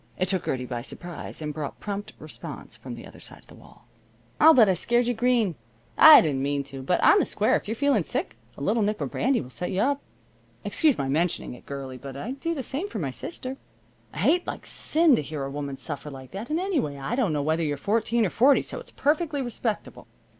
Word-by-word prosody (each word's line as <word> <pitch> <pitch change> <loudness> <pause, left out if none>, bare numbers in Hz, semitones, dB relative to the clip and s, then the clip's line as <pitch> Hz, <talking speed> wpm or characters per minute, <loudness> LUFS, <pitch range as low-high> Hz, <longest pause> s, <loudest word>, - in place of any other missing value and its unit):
It 185 - 0
took 190 -3 0
Gertie 125 -1 -2
by 120 -1 -4
surprise, 170 +4 -5
and 150 0 -3
brought 150 -2 -5
prompt 205 0 -5
response - - -8
from - - -8
the - - -10
other - - -13
side - - -7
of - - -27
the - - -16
wall. - - -18 0.5
"I'll 320 +1 +8
bet 230 -4 +7
I 190 - +4
scared 240 +7 +1
you 245 - +1
green. 235 -4 +2 0.4
I 310 -1 +10
didn't 140 -4 -1
mean 140 0 0
to, 135 -1 -8
but, 175 +7 +1
on 410 - +7
the - - +2
square, 210 - +2
if - - -2
you're 220 - -2
feeling 280 -3 +2
sick, 160 - -3 0.2
a - - -9
little 220 +7 +2
nip 210 +1 0
of - - -3
brandy 260 +2 +1
will 125 - -10
set 180 - -4
you 185 - -1
up. 280 +4 +1 0.6
Excuse 310 -5 +3
my 135 - -1
mentioning 160 0 0
it, 125 - -14
girlie, 135 -2 -6
but 135 0 -8
I'd 255 - -5
do 335 +2 -2
the 270 - -3
same 280 - -2
for - - -6
my - - -2
sister. 265 -5 -5 0.5
I - - -12
hate 300 - +2
like - - -5
sin 320 -3 +3
to - - 0
hear 145 -1 -5
a 135 - -4
woman 140 -1 -5
suffer 150 0 -6
like 130 -2 -10
that, 205 +6 -6
and, 310 +2 0
anyway, 315 - -1
I 140 - -4
don't 240 -8 +1
know 145 -2 0
whether 160 +3 +1
you're 145 -3 -1
fourteen 225 +6 +1
or 180 - -1
forty, 270 +5 +4
so - - -6
it's 485 - -12
perfectly 295 -1 0
respectable. 230 -2 -4
205 Hz, 240 wpm, -26 LUFS, -, 0.6 s, I